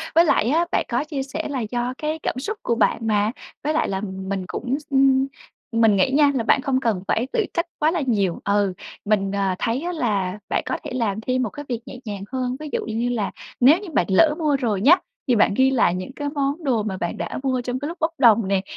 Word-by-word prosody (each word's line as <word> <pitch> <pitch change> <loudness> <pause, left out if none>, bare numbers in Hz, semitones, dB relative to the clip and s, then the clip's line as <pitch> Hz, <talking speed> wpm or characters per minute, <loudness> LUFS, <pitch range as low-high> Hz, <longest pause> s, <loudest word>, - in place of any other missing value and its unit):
với 335 +1 +7
lại 240 -7 +2
á, 330 +4 +3
bạn - - +1
có 240 +3 0
chia 290 -3 -4
sẻ 295 +4 -4
là 270 -3 -2
do 245 +1 -1
cái 310 +1 -3
cảm - - -1
xúc 420 +10 -4
của 235 - +1
bạn 225 -1 +1
mà, 210 0 +2 0.3
với 305 +1 0
lại 315 - +1
là 190 0 -2
mình 190 -1 -4
cũng 260 +3 -2
x 300 - -20
ưm, 270 -1 +4 0.4
mình 225 -3 +4
nghĩ 195 +8 +2
nha 290 0 +5
là 235 - 0
bạn 260 - +3
không 260 -1 +1
cần 220 -8 -1
phải 235 +3 +1
tự 440 -3 +2
trách 335 - 0
quá 310 +1 +3
là 340 -2 -1
nhiều, 200 -7 +1
ừ, 200 -2 +2 0.3
mình, 195 -2 +1
à, 195 -2 0
thấy 235 +4 -1
á, 350 - -3
là 210 - -1
bạn - - 0
có - - -2
thể - - -6
làm 220 -4 -1
thêm 255 +2 0
một 220 - -2
cái 290 +6 -9
việc 240 - -2
nhẹ 250 - -9
nhàng 200 -2 -5
hơn, 255 -1 -1
ví 305 -1 -6
dụ - - -1
như 230 +2 -1
là 220 -5 -1 0.3
nếu 280 +8 +6
như 400 -2 -8
bạn 180 - +2
lỡ 300 +11 +5
mua 300 -3 +2
rồi 220 -7 -1
nhá, 305 +9 +7 0.3
thì 245 - +4
bạn 205 - +4
ghi 260 +5 +4
lại 205 -8 +3
những 185 +8 -5
cái 290 -1 -3
món 285 +2 -2
đồ 240 -7 +1
mà 190 -3 -3
bạn 175 -2 -3
đã 170 - -4
mua 260 -2 0
trong 250 +1 -3
cái 285 - -4
lúc 335 +2 -6
bốc 320 +1 +1
đồng 230 -6 +5
nè. 195 -1 +1
245 Hz, 260 wpm, -22 LUFS, 205-285 Hz, 0.4 s, với